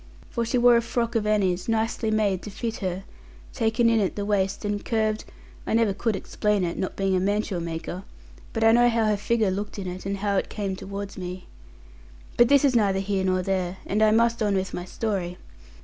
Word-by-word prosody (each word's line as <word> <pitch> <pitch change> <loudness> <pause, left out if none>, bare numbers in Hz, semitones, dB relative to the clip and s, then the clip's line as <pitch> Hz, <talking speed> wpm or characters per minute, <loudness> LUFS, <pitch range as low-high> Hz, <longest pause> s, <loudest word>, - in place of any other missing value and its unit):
For 235 -1 -1
she 250 - 0
wore 240 -1 +6
a - - +2
frock 235 0 -2
of 220 -3 0
Annie's, 190 -3 +1
nicely 225 0 0
made 205 -4 +1
to - - -7
fit 225 +2 -4
her, 185 -1 -3 0.5
taken 230 0 +2
in 230 -1 +4
at 195 -3 0
the 205 - -3
waist 200 0 0
and 205 0 -2
curved 220 -1 0 0.4
I - - +1
never 225 -3 +3
could 215 +2 -1
explain 210 +1 0
it, 170 -1 -2
not 190 - -3
being 195 -1 +1
a - - +2
mantua 200 -1 0
maker; 170 +2 -5 0.5
but 225 - -1
I 225 - +7
know 240 +1 +5
how 230 -1 +1
her 215 -1 +2
figure 210 0 +1
looked 205 +3 -4
in 195 - -5
it, 185 +1 -5
and 200 0 -2
how 200 0 0
it - - -1
came 200 -3 -3
towards 200 +1 -7
me. 180 0 -6 0.9
But 240 - +6
this 280 0 +5
is 265 -3 +3
neither 200 -4 +3
here 195 0 -1
nor 185 -1 +1
there; 185 -1 -1
and 210 +2 0
I 215 - +6
must 230 +1 +2
on 205 -2 +2
with 190 0 -2
my 175 - -4
story. 185 -3 -3
205 Hz, 220 wpm, -25 LUFS, 190-225 Hz, 0.9 s, I